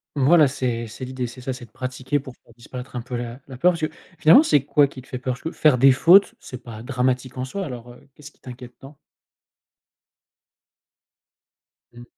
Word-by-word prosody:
Voilà, 145 +1 +4
c'est 120 -3 -3
c'est 120 +4 -8
l'idée. 130 -1 -4
C'est 120 +2 -9
ça, 130 +1 -4
c'est 125 - -11
de 115 - -25
pratiquer 130 +4 -3
pour 130 -3 -11
faire 115 - -24
disparaître 125 +1 -9
un - - -3
peu 125 +1 -7
la 120 +1 -6
la 130 - -10
peur. 180 +8 +3
Parce 170 - -6
que 155 - 0 0.3
finalement, 250 - +7
c'est 145 - +2
quoi 145 0 +4
qui 135 -1 -12
te 130 - -21
fait 125 - -6
peur? 125 0 -3
Parce - - -17
que 165 - -5
faire 155 -7 +3
des 135 +1 +6
fautes, 180 +9 +5
c'est 125 -1 -10
pas 115 -2 -10
dramatique 130 0 -2
en 130 - -3
soi. 195 +9 -5
Alors, 120 -3 -9
heu, 125 - -20
qu'est-ce 150 +1 -14
qui - - -35
t'inquiète 125 -1 -11
tant? 140 +1 -14 3.0
Mmh. 120 - -12
130 Hz, 210 wpm, -22 LUFS, 125-140 Hz, 3.0 s, finalement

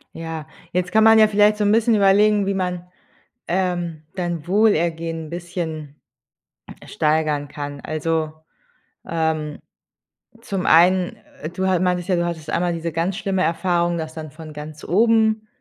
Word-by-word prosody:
Ja, 165 -2 -6 0.3
jetzt 180 0 -1
kann 220 0 +4
man 225 0 +7
ja 215 - +7
vielleicht 210 0 +3
so 210 - 0
'n 205 - +3
bisschen 225 +1 +3
überlegen, 205 +1 +4
wie 200 - 0
man, 180 -2 -3 0.6
ähm, 175 -3 -2
dein 175 -3 -3
Wohlergehen 165 -5 +1
bisschen 165 -3 -6 0.9
steigern 150 -2 0
kann. 145 -1 -7
Also, 155 0 -2 0.8
ähm, 160 -2 -2 0.8
zum 195 -5 -3
einen, 180 +2 +4 0.3
äh, 155 - -3
du 190 +2 -2
ha 185 - +2
meintest 180 0 0
ja, 185 - +2
du 175 - 0
hattest 165 -3 -4
einmal 175 0 0
diese 170 0 -3
ganz 170 +4 -1
schlimme 195 -3 -1
Erfahrung, 170 0 0
dass 160 -1 -5
dann 155 -2 -7
von 155 -1 -10
ganz 150 +1 -9
oben, 220 +2 +2
175 Hz, 150 wpm, -21 LUFS, 160-195 Hz, 0.9 s, man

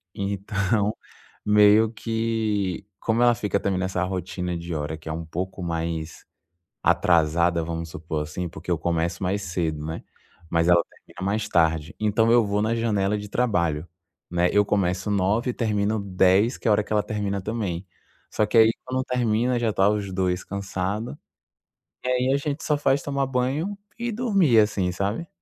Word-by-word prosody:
Então, 100 +1 -1 0.5
meio 105 +1 +5
que 110 -5 -1
como 115 +2 +1
ela 120 0 +6
fica 105 -3 -1
também 95 -2 -1
nessa 95 -1 -1
rotina 90 -1 -3
de 85 0 -6
hora 75 +1 -3
que 80 +1 -9
é - - -2
um 80 +1 -4
pouco 90 +3 -5
mais 80 -1 -3 0.6
atrasada, 85 0 +3
vamos 85 0 -4
supor 80 -1 -4
assim, 85 +4 -4
porque 80 +2 -9
eu 85 - +2
começo 85 +1 -1
mais 100 +2 0
cedo, 80 -4 -2
né? 80 +1 -5 0.5
Mas 85 0 +1
ela 85 -1 +6
termina 90 - -11
mais 105 +1 0
tarde. 80 +1 +1
Então 110 +2 +2
eu 120 -1 +5
vou 100 +1 0
na 110 +2 +1
janela 105 -3 +1
de 105 - -7
trabalho, 85 -9 0 0.4
né? 90 0 +2
Eu 105 0 +4
começo 95 0 0
9h, 105 +6 +1
termino 105 -2 0
22h, 95 +4 +3
que - - -2
é - - +4
a - - +6
hora 105 0 +2
que - - -6
ela 105 -1 +3
termina 100 -2 -2
também. 100 -5 -3 0.4
Só 105 - +1
que 115 - -2
aí 110 0 +7
quando 130 0 -1
termina, 120 0 +1
já 115 -2 0
tá 95 +1 +3
os 100 -2 -2
dois 90 -1 -1
cansado. 100 +3 -3 0.9
E - - -4
aí 125 +1 +2
a - - +3
gente 145 +2 -3
só 150 -1 +1
faz 135 -1 +2
tomar 140 -1 -1
banho 135 +10 -1 0.2
e 240 0 -2
dormir, 200 - +3
assim, 100 -4 +2
sabe? 100 - -2
100 Hz, 175 wpm, -24 LUFS, 90-115 Hz, 0.9 s, aí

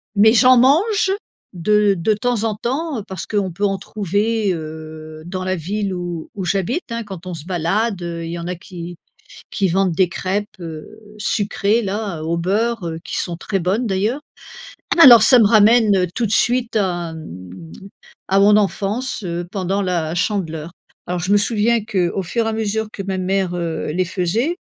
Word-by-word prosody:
mais 215 +2 +6
j'en 255 +2 +6
mange 380 - +3 0.4
de 205 +3 +2
de 195 +6 +1
temps 230 +1 -1
en 225 -1 0
temps, 265 +4 -3
parce 190 -2 -6
qu'on 200 -3 -1
peut 200 +5 -2
en 195 -1 0
trouver, 205 +2 -1
heu, 155 -1 -8
dans 185 +1 -5
la 185 0 -1
ville 195 +3 -3
où 175 -2 -5
où 195 -3 -4
j'habite, 200 - -1
hein, 230 0 -3
quand 190 -4 -9
on 180 - -5
se 160 -2 -8
balade, 190 +4 -1
heu, 170 -1 -5
il 165 - -5
y 170 - -4
en 170 - -6
a 180 - -2
qui 175 0 -9 0.6
qui 195 - +1
vendent 190 +1 +1
des 185 +1 +3
crêpes, 190 +4 -2
heu, 165 +4 -9 0.2
sucrées 210 +1 0
là, 200 -5 -3
au 165 +1 -1
beurre, 205 +5 0
heu, 160 0 -5
qui - - -4
sont 175 -2 -2
très 195 +3 -2
bonnes, 195 +8 0
d'ailleurs. 210 +7 0 0.8
Alors 245 -8 +10
ça 250 +3 +7
me 225 - +6
ramène 210 -3 +5
tout 240 - 0
de 210 - -3
suite 240 +1 +1
à 175 -5 -1
m 95 - -10 0.8
à 195 +1 +4
mon 205 +1 +6
enfance, 215 +4 -1
heu, 175 0 -3
pendant 195 0 -1
la 170 -3 -1
Chandeleur. 170 -5 -2 0.4
Alors, 180 0 -2
je 180 +3 -2
me 205 - +6
souviens 225 +1 +1
qu'au 190 -3 -1
fur 230 +6 -1
et - - 0
à - - -2
mesure, 220 0 -1
que 195 - -6
ma 190 -1 -3
mère, 185 -1 0
heu, 165 -3 -3
les 180 +3 0
faisait, 195 - -1
195 Hz, 185 wpm, -19 LUFS, 175-220 Hz, 0.8 s, Alors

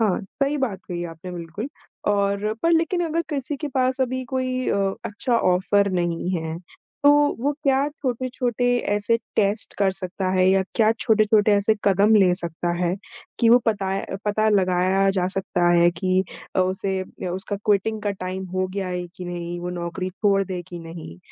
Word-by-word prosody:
हाँ, 215 -3 +2
सही 275 +9 -2
बात 215 -8 -2
कही 175 -1 -3
आपने 165 +2 -8
बिल्कुल 175 - -6 0.4
और 200 +1 +1
पर 335 - +3
लेक़िन 330 +2 +2
अगर 330 +1 0
किसी 280 0 -3
के 300 +1 -4
पास 260 0 0
अभी 260 0 -1
कोई 255 0 -2
अ, 195 -1 +1
अच्छा 235 +4 -1
ऑफ़र 200 +1 +2
नहीं 175 -1 -1
है 160 0 -4 0.4
तो 285 - +7 0.3
वो 285 +4 +1
क्या 275 +1 +2
छोटे-छोटे 250 -3 -1 0.2
ऐसे 210 +3 +2 0.2
टेस्ट 205 +1 +1
कर 200 -1 +3
सकता 185 0 -3
है 185 0 +3
या 190 0 +4
क्या 220 -2 +4
छोटे-छोटे 215 -1 +3
ऐसे 210 +2 +3
कदम 200 +2 +4
ले 190 -4 +5
सकता 175 -1 -3
है 175 +1 +1 0.4
कि 230 - +4
वो 240 +2 +8
पताए 195 -3 0
अ, 195 - -5
पता 215 +1 +2
लगाया 190 -1 +2
जा 185 -2 0
सकता 180 -2 +1
है 175 0 +5
कि 185 +2 0 0.3
अ, - - +4
उसे 190 +1 0
अ, 185 0 -7
उसका 195 +3 -4
क्विटिंग 210 +1 +1
का 205 - 0
टाइम 190 0 -5
हो 185 0 +1
गया 195 -2 -2
है 180 -1 -3
कि 180 - -7
नहीं 175 0 -5
वो 180 0 -4
नौकरी 180 +1 -4
छोड़ 195 +1 +2
दे 180 -1 -5
कि 175 - -7
नहीं 165 - -9
195 Hz, 185 wpm, -23 LUFS, 180-230 Hz, 0.4 s, वो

